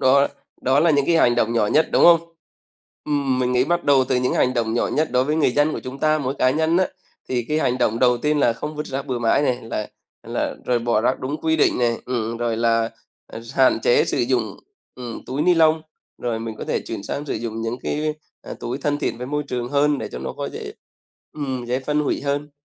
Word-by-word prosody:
đó 140 Hz, +1 st, +4 dB, 0.3 s
đó 135 Hz, +2 st, +3 dB
là 165 Hz, +1 st, +4 dB
những 140 Hz, -2 st, +2 dB
cái 170 Hz, -, +3 dB
hành 120 Hz, -7 st, +4 dB
động 115 Hz, -1 st, +1 dB
nhỏ 115 Hz, -3 st, +2 dB
nhất, 155 Hz, +9 st, +3 dB
đúng -, -, +4 dB
không? 170 Hz, -1 st, +8 dB, 0.8 s
Ừm, 140 Hz, -3 st, 0 dB
mình 125 Hz, 0 st, 0 dB
nghĩ 125 Hz, +1 st, +3 dB
bắt 175 Hz, +2 st, 0 dB
đầu 140 Hz, -2 st, +4 dB
từ 130 Hz, 0 st, -1 dB
cái 125 Hz, -, +2 dB
những 125 Hz, -, 0 dB
hành 130 Hz, -, +2 dB
động 115 Hz, -2 st, 0 dB
nhỏ 120 Hz, -, +1 dB
nhất 155 Hz, +2 st, 0 dB
đối 125 Hz, +1 st, +2 dB
với 150 Hz, +3 st, 0 dB
người 155 Hz, -5 st, +3 dB
dân 145 Hz, +3 st, +2 dB
của -, -, -4 dB
chúng 130 Hz, +2 st, -8 dB
ta, 155 Hz, +1 st, +2 dB
mỗi 135 Hz, -2 st, -2 dB
cá 130 Hz, -2 st, +2 dB
nhân 160 Hz, +4 st, +1 dB
á, 185 Hz, 0 st, +3 dB, 0.4 s
thì 125 Hz, -2 st, -1 dB
cái 155 Hz, 0 st, +1 dB
hành 125 Hz, -4 st, 0 dB
động 115 Hz, -2 st, +1 dB
đầu 125 Hz, 0 st, +4 dB
tiên 150 Hz, +4 st, +1 dB
là 120 Hz, -4 st, +3 dB
không 150 Hz, +6 st, -6 dB
vứt 150 Hz, 0 st, -4 dB
rác 135 Hz, +2 st, -4 dB
bừa 125 Hz, -3 st, -2 dB
mãi 115 Hz, +4 st, +2 dB
này, 125 Hz, -4 st, +1 dB
là 115 Hz, -2 st, -4 dB, 0.3 s
là -, -, -3 dB
rồi 125 Hz, -1 st, +1 dB
bỏ 115 Hz, -2 st, +1 dB
rác 125 Hz, +3 st, 0 dB
đúng 145 Hz, +4 st, -4 dB
quy 160 Hz, 0 st, +1 dB
định 150 Hz, -, +3 dB
này, 120 Hz, -1 st, +3 dB, 0.2 s
ừm, 125 Hz, -2 st, -1 dB
ừm, 115 Hz, -, -4 dB
rồi 120 Hz, -1 st, -1 dB
là, 115 Hz, 0 st, +1 dB, 0.4 s
à, -, -, -9 dB
hạn 130 Hz, -1 st, +4 dB
chế 480 Hz, -2 st, +4 dB
sử -, -, -2 dB
dụng, -, -, 0 dB, 0.4 s
ừm, 120 Hz, -2 st, -8 dB
túi 135 Hz, +4 st, -2 dB
ni 180 Hz, +1 st, +4 dB
lông. 160 Hz, -1 st, +4 dB, 0.4 s
Rồi 120 Hz, -2 st, -2 dB
mình 115 Hz, -1 st, -5 dB
có -, -, -5 dB
thể -, -, -1 dB
chuyển -, -, -6 dB
sang 145 Hz, -, -5 dB
sử -, -, -2 dB
dụng 115 Hz, 0 st, -4 dB
những 115 Hz, +1 st, -2 dB
cái, 155 Hz, +1 st, -1 dB, 0.3 s
a, -, -, -11 dB
à, -, -, -5 dB
túi 125 Hz, +3 st, -4 dB
thân 145 Hz, +1 st, -1 dB
thiện -, -, -2 dB
với 125 Hz, -, -5 dB
môi 150 Hz, +2 st, -2 dB
trường 120 Hz, -1 st, -3 dB
hơn 145 Hz, +1 st, +2 dB
để -, -, -5 dB
cho -, -, -5 dB
nó, -, -, -5 dB
có, -, -, -5 dB
dễ -, -, -7 dB, 0.6 s
ừm, 130 Hz, -4 st, -4 dB
dễ 125 Hz, +2 st, -1 dB
phân 150 Hz, +3 st, 0 dB
hủy 150 Hz, -, -1 dB
hơn. 145 Hz, +1 st, -2 dB
130 Hz, 260 wpm, -22 LUFS, 120-150 Hz, 0.8 s, không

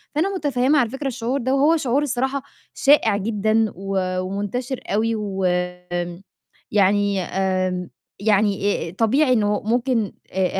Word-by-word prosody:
فأنا 380 Hz, +6 st, +1 dB
مُتفهِّمة 290 Hz, -2 st, +2 dB
على 240 Hz, -4 st, +1 dB
فكرة 270 Hz, +3 st, -4 dB
الشعور 250 Hz, +1 st, -2 dB
ده 260 Hz, +3 st, +1 dB
وهو 300 Hz, +4 st, +4 dB
شعور 275 Hz, -1 st, +1 dB
الصراحة 265 Hz, 0 st, -1 dB, 0.3 s
شائِع 250 Hz, -7 st, +4 dB
جدًا 215 Hz, +1 st, +1 dB
و 190 Hz, -1 st, -2 dB
ومنتشر 205 Hz, +7 st, -3 dB
أوي، 225 Hz, +3 st, +1 dB
وم 195 Hz, -3 st, -3 dB, 1.3 s
يعني 200 Hz, -1 st, +2 dB
آمم 185 Hz, -1 st, -1 dB, 0.3 s
يعني 205 Hz, -1 st, +2 dB, 0.2 s
آآ، -, -, -6 dB
آآ -, -, -9 dB
طبيعي 255 Hz, -, +2 dB
إنه 210 Hz, -3 st, +1 dB
ممكن 235 Hz, -2 st, 0 dB, 0.2 s
آآ، 190 Hz, 0 st, +1 dB
220 Hz, 135 wpm, -22 LUFS, 195-260 Hz, 1.3 s, وهو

